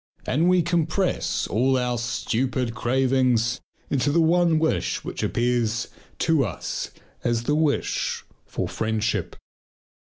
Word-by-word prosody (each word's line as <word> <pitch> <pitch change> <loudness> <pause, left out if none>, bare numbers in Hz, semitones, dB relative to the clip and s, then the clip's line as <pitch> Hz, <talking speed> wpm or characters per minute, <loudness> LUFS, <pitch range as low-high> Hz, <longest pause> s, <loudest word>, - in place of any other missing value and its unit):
And 165 +6 +2
we 180 -1 +4
compress 170 +2 0
all 130 +4 +2
our 125 -1 0
stupid 125 +1 -1
cravings 125 0 +1 0.3
into 145 +1 +2
the 170 - +3
one 170 0 +4
wish 160 0 0
which - - -5
appears 120 -1 0 0.3
to 160 -4 +2
us 100 -9 -4 0.3
as 120 -1 0
the 150 - +1
wish 155 -1 0 0.2
for - - -3
friendship. 110 0 -1
130 Hz, 120 wpm, -24 LUFS, 120-160 Hz, 0.3 s, we